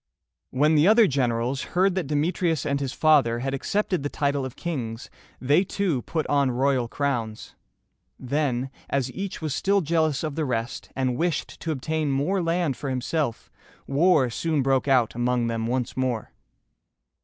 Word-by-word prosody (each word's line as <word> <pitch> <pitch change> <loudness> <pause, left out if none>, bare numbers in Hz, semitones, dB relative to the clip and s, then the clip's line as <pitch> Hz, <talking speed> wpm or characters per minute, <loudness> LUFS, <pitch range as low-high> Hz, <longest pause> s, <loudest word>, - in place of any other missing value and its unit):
When 150 +4 +2
the 155 +3 +5
other 220 +2 +7
generals 125 - 0 0.2
heard 190 +1 +4
that 180 -5 -2
Demetrius 160 +1 0
and 140 0 0
his 135 -2 -2
father 140 -8 +3
had 135 +3 -3
accepted 185 +5 -1
the 145 - -2
title 140 -2 -1
of 130 - -7
kings, 120 -9 -5 0.3
they 145 +8 +3
too 185 -9 -1
put 160 +6 -2
on 140 -2 +2
royal 130 0 +1
crowns. 115 -5 -3 0.6
Then, 130 -1 -1 0.2
as 135 -2 -1
each 195 -3 -5
was 155 -4 -1
still 200 +6 +2
jealous 160 -3 +1
of 155 -2 -2
the 160 - -2
rest, 120 -3 -3
and 130 -2 0
wished 165 -1 -2
to 165 - -3
obtain 155 +1 -1
more 150 +8 0
land 165 -4 0
for 140 - -4
himself, 130 0 -2 0.3
war 140 -3 +3
soon 155 +3 0
broke 135 0 +1
out 125 -5 +3
among 120 0 0
them 115 -1 -2
once 125 0 -2
more. 125 -4 -2
140 Hz, 165 wpm, -25 LUFS, 125-160 Hz, 0.6 s, other